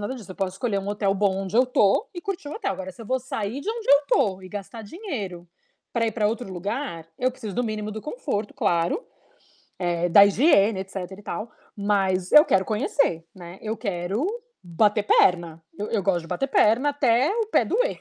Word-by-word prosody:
nada 210 Hz, +6 st, -3 dB
disso, 215 Hz, -7 st, -11 dB
eu -, -, -15 dB
posso 190 Hz, -2 st, -3 dB
escolher 220 Hz, -5 st, -1 dB
um 195 Hz, -, -6 dB
hotel 205 Hz, -1 st, 0 dB
bom 195 Hz, -1 st, +1 dB
onde 195 Hz, +2 st, -7 dB
eu 250 Hz, +2 st, +5 dB
tô 250 Hz, -, +2 dB
e 350 Hz, -, -7 dB
curtir 385 Hz, -5 st, -4 dB
o -, -, -6 dB
hotel. -, -, -2 dB
Agora, 190 Hz, 0 st, -6 dB
se 230 Hz, -, -12 dB
eu -, -, -11 dB
vou 260 Hz, +2 st, 0 dB
sair 240 Hz, 0 st, -4 dB
de 360 Hz, -, -7 dB
onde 455 Hz, -1 st, -6 dB
eu 285 Hz, +1 st, +5 dB
tô, 190 Hz, -7 st, +2 dB
e 185 Hz, -, -10 dB
gastar 205 Hz, +3 st, -7 dB
dinheiro 205 Hz, -, -6 dB, 0.5 s
pra 230 Hz, -1 st, +1 dB
ir 220 Hz, -, -1 dB
pra 210 Hz, -2 st, +1 dB
outro 225 Hz, -1 st, -3 dB
lugar, 185 Hz, -, -4 dB
eu 255 Hz, +1 st, +1 dB
preciso 225 Hz, -6 st, -8 dB
do 245 Hz, -, 0 dB
mínimo 215 Hz, -2 st, -3 dB
do 220 Hz, -, -6 dB
conforto, 265 Hz, -, -4 dB
claro, 175 Hz, -, 0 dB, 0.7 s
eh, 175 Hz, -1 st, 0 dB
da 200 Hz, +4 st, +9 dB
higiene, 205 Hz, -, +4 dB
etc. 195 Hz, +1 st, -11 dB, 0.2 s
e 205 Hz, -, -14 dB
tal, 215 Hz, +3 st, -5 dB, 0.2 s
mas 195 Hz, -3 st, 0 dB
eu 300 Hz, +2 st, +9 dB
quero 190 Hz, -1 st, +2 dB
conhecer, 210 Hz, -, 0 dB
né. 175 Hz, 0 st, -10 dB
Eu 220 Hz, +1 st, -2 dB
quero 195 Hz, -, -2 dB, 0.4 s
bater 205 Hz, +5 st, +2 dB
perna, 170 Hz, -5 st, +3 dB, 0.2 s
eu 210 Hz, -, -3 dB
eu 210 Hz, -4 st, 0 dB
gosto 175 Hz, -2 st, +1 dB
de 165 Hz, -, -12 dB
bater 180 Hz, +10 st, -2 dB
perna 250 Hz, +2 st, +3 dB
até 270 Hz, 0 st, +2 dB
o 455 Hz, -2 st, 0 dB
pé 440 Hz, -, +2 dB
doer. -, -, 0 dB
210 Hz, 215 wpm, -24 LUFS, 190-255 Hz, 0.7 s, da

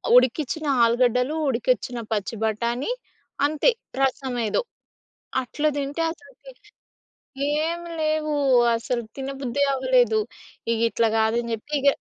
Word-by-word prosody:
ఉడికిచ్చిన 275 Hz, +5 st, +3 dB, 0.2 s
ఆలుగడ్డలు, 250 Hz, +4 st, +2 dB
ఉడికిచ్చిన 245 Hz, 0 st, 0 dB, 0.2 s
పచ్చి 210 Hz, +1 st, -2 dB
బఠాణి 235 Hz, -, -1 dB, 0.6 s
అంతే, 310 Hz, +10 st, +2 dB, 0.3 s
రసమేదో 255 Hz, -, 0 dB, 0.8 s
అట్ల 280 Hz, +4 st, -6 dB
దింటే 285 Hz, +3 st, -3 dB
అసలుకి -, -, -16 dB, 1.1 s
ఏమి 340 Hz, +1 st, -3 dB
లేవు. 310 Hz, 0 st, 0 dB, 0.4 s
అసలు 235 Hz, +1 st, -2 dB, 0.2 s
తిన 270 Hz, 0 st, -4 dB
బుద్ధి 275 Hz, +1 st, 0 dB
అవ్వలేదు. 450 Hz, -, +3 dB, 0.5 s
ఇగ 230 Hz, -, +1 dB
ఇట్లా 230 Hz, -1 st, +2 dB
కాదని 230 Hz, +2 st, +1 dB
జెప్పి 225 Hz, +7 st, -7 dB
ఇగ 280 Hz, -, +1 dB
260 Hz, 105 wpm, -24 LUFS, 235-305 Hz, 1.1 s, ఉడికిచ్చిన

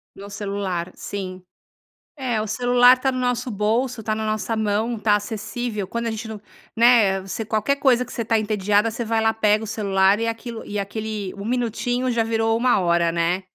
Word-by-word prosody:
No 200 Hz, +1 st, -10 dB
celular. 200 Hz, -4 st, -3 dB
Sim. 185 Hz, -2 st, -6 dB, 0.7 s
É, 245 Hz, -5 st, -1 dB
o 215 Hz, -, -2 dB
celular 245 Hz, +3 st, +5 dB
tá 265 Hz, +1 st, +1 dB
no 255 Hz, -, -4 dB
nosso 245 Hz, 0 st, -1 dB
bolso, 225 Hz, +4 st, 0 dB
tá 215 Hz, 0 st, -1 dB
na 220 Hz, 0 st, -3 dB
nossa 215 Hz, +1 st, -1 dB
mão, 220 Hz, +2 st, 0 dB
tá 210 Hz, 0 st, +3 dB
acessível. 215 Hz, 0 st, -4 dB
Quando 235 Hz, +2 st, -3 dB
a -, -, 0 dB
gente 220 Hz, +1 st, -6 dB
não 215 Hz, -2 st, -7 dB, 0.4 s
né, 225 Hz, -5 st, +5 dB
você 195 Hz, +4 st, -5 dB
qualquer 220 Hz, +6 st, 0 dB
coisa 250 Hz, -3 st, +3 dB
que -, -, -12 dB
você 230 Hz, -, -3 dB
tá 225 Hz, 0 st, +2 dB
entediada, 210 Hz, 0 st, +1 dB
você 235 Hz, +1 st, -4 dB
vai 225 Hz, 0 st, 0 dB
lá, 220 Hz, 0 st, +2 dB
pega 215 Hz, 0 st, +2 dB
o -, -, -6 dB
celular 200 Hz, -1 st, +2 dB
e 230 Hz, -, 0 dB
aquilo 230 Hz, 0 st, -5 dB
e 205 Hz, -, -5 dB
aquele 210 Hz, -1 st, -4 dB
1 200 Hz, 0 st, -8 dB
minutinho 245 Hz, +1 st, -1 dB
já 230 Hz, -1 st, +2 dB
virou 225 Hz, 0 st, +1 dB
1 245 Hz, -1 st, +3 dB
hora, 170 Hz, -2 st, +2 dB
né. 175 Hz, +3 st, 0 dB
220 Hz, 200 wpm, -22 LUFS, 205-235 Hz, 0.7 s, celular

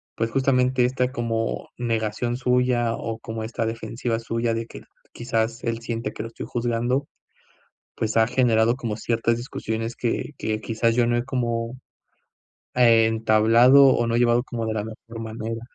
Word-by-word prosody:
pues, 115 Hz, 0 st, -1 dB
justamente 130 Hz, -2 st, +2 dB
esta 125 Hz, 0 st, 0 dB
como 115 Hz, -2 st, -2 dB
negación 115 Hz, 0 st, -1 dB
suya 125 Hz, -2 st, +1 dB
o 115 Hz, -1 st, -4 dB
como 110 Hz, 0 st, -6 dB
esta 115 Hz, +1 st, -3 dB
defensiva 115 Hz, +1 st, -3 dB
suya 115 Hz, 0 st, -1 dB
de 115 Hz, 0 st, -2 dB
que, -, -, -10 dB, 0.3 s
quizás 115 Hz, -1 st, -2 dB
él 115 Hz, -1 st, -2 dB
siente 115 Hz, -2 st, -3 dB
que -, -, -6 dB
lo 115 Hz, -, -5 dB
estoy 115 Hz, -, -8 dB
juzgando, 120 Hz, +3 st, -1 dB, 0.9 s
pues, 110 Hz, 0 st, -2 dB
ha 110 Hz, -, +5 dB
generado 120 Hz, -2 st, +3 dB
como 115 Hz, -5 st, -4 dB
ciertas 115 Hz, +1 st, 0 dB
discusiones 115 Hz, -1 st, -4 dB
que 120 Hz, +4 st, -2 dB
que 110 Hz, 0 st, -2 dB
quizás 115 Hz, +1 st, 0 dB
yo 120 Hz, -, +3 dB
no 120 Hz, 0 st, +1 dB
he 120 Hz, -, -1 dB
como, 120 Hz, -2 st, -2 dB, 1.0 s
e 115 Hz, -2 st, +5 dB
entablado 115 Hz, +4 st, +5 dB
o 120 Hz, -2 st, +2 dB
no 115 Hz, -, -1 dB
he -, -, +3 dB
llevado 120 Hz, 0 st, +3 dB
como 115 Hz, -3 st, -4 dB
de 110 Hz, -, -2 dB
la 105 Hz, -, -2 dB
mejor 115 Hz, +1 st, -10 dB
manera. 115 Hz, 0 st, -5 dB
115 Hz, 170 wpm, -24 LUFS, 115-120 Hz, 1.0 s, ha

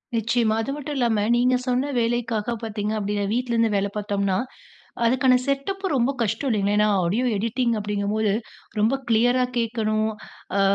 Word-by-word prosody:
நிச்சயமா, 225 Hz, 0 st, +1 dB
அது 275 Hz, -, -3 dB
மட்டும் 295 Hz, 0 st, -5 dB
இல்லாம, 230 Hz, -4 st, +2 dB, 0.2 s
நீங்க 250 Hz, +1 st, +3 dB
சொன்ன 255 Hz, +3 st, 0 dB
வேலைக்காக 235 Hz, -1 st, -1 dB
பார்த்தீங்க 210 Hz, -1 st, -3 dB
அப்படின்னா, 205 Hz, 0 st, -1 dB
வீட்டுல 245 Hz, 0 st, -1 dB
இருந்து 230 Hz, -1 st, +3 dB
வேலை 200 Hz, +1 st, +1 dB
பார்த்தோம்னா, 200 Hz, -2 st, 0 dB, 0.7 s
அதுக்கான 255 Hz, +1 st, +4 dB
செட்டப்பு 380 Hz, +9 st, -2 dB
ரொம்ப 250 Hz, +2 st, +2 dB
கஷ்டம் 225 Hz, +6 st, -1 dB
இல்லைங்களா? 205 Hz, -1 st, +1 dB
ஏன்னா 210 Hz, 0 st, +4 dB, 0.2 s
ஆடியோ 215 Hz, +9 st, 0 dB
எடிட்டிங் 230 Hz, +3 st, 0 dB
அப்படிங்கும்போது 205 Hz, 0 st, 0 dB, 0.5 s
ரொம்ப 230 Hz, +6 st, +3 dB
கிளியரா 245 Hz, +3 st, +3 dB
கேட்கணும். 220 Hz, -1 st, 0 dB, 0.5 s
அ -, -, +3 dB
230 Hz, 145 wpm, -24 LUFS, 210-250 Hz, 0.7 s, அதுக்கான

